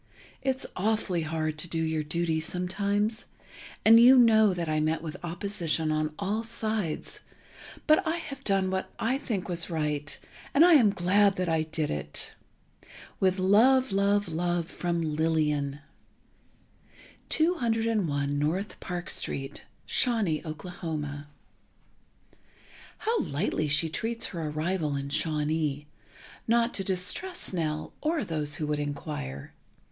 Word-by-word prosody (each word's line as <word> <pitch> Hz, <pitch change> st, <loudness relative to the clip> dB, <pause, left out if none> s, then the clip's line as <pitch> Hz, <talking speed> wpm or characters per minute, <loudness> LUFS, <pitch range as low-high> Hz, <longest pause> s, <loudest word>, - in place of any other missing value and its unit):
It's 265 Hz, -1 st, 0 dB
awfully 200 Hz, -3 st, 0 dB
hard 155 Hz, -1 st, -2 dB
to 175 Hz, -, -2 dB
do 165 Hz, 0 st, -2 dB
your 160 Hz, -1 st, 0 dB
duty 160 Hz, +1 st, -1 dB
sometimes, 200 Hz, +6 st, -1 dB, 0.6 s
and 225 Hz, +1 st, +9 dB
you 255 Hz, +3 st, +8 dB
know 220 Hz, -4 st, +6 dB
that 175 Hz, -2 st, -3 dB
I 155 Hz, 0 st, +1 dB
met 155 Hz, +1 st, 0 dB
with 155 Hz, -2 st, -5 dB
opposition 170 Hz, -3 st, -1 dB
on 155 Hz, 0 st, -1 dB
all 205 Hz, +3 st, -1 dB
sides 220 Hz, -7 st, -2 dB, 0.7 s
but 310 Hz, 0 st, +5 dB
I 320 Hz, -, +1 dB
have 280 Hz, -5 st, -7 dB
done 195 Hz, -3 st, +1 dB
what 190 Hz, 0 st, -2 dB
I 255 Hz, +4 st, 0 dB
think 210 Hz, -9 st, -3 dB
was 175 Hz, -2 st, -1 dB
right 150 Hz, -3 st, -2 dB, 0.4 s
and 310 Hz, +4 st, +8 dB
I 355 Hz, -, +7 dB
am 245 Hz, -9 st, +6 dB
glad 195 Hz, +2 st, +3 dB
that 185 Hz, -1 st, -1 dB
I 160 Hz, -1 st, +2 dB
did 155 Hz, -1 st, -2 dB
it.... 75 Hz, 0 st, -3 dB, 0.9 s
With 185 Hz, 0 st, +2 dB
love 230 Hz, +7 st, +4 dB
love 200 Hz, +1 st, +2 dB
love 175 Hz, 0 st, -1 dB
from 170 Hz, -1 st, -2 dB
LILLIAN. 150 Hz, -2 st, 0 dB, 1.5 s
201 225 Hz, -, +1 dB
N. 170 Hz, +7 st, 0 dB
Park 180 Hz, -1 st, -5 dB
St. 135 Hz, +1 st, -3 dB, 0.2 s
Shawnee, 220 Hz, -11 st, +1 dB
Okla. 155 Hz, -3 st, -5 dB, 1.7 s
How 455 Hz, +1 st, 0 dB
lightly 155 Hz, +1 st, -1 dB
she 150 Hz, +3 st, +2 dB
treats 225 Hz, +8 st, -1 dB
her 165 Hz, -4 st, -4 dB
arrival 155 Hz, 0 st, -1 dB
in 140 Hz, 0 st, -4 dB
Shawnee—not 155 Hz, -, -2 dB
to 195 Hz, -, -2 dB
distress 195 Hz, -, 0 dB
Nell, 155 Hz, -3 st, -2 dB
or 315 Hz, -1 st, 0 dB
those 155 Hz, -5 st, -2 dB
who 155 Hz, -, -2 dB
would 150 Hz, 0 st, -1 dB
inquire. 145 Hz, -, -5 dB
175 Hz, 130 wpm, -28 LUFS, 155-215 Hz, 1.7 s, and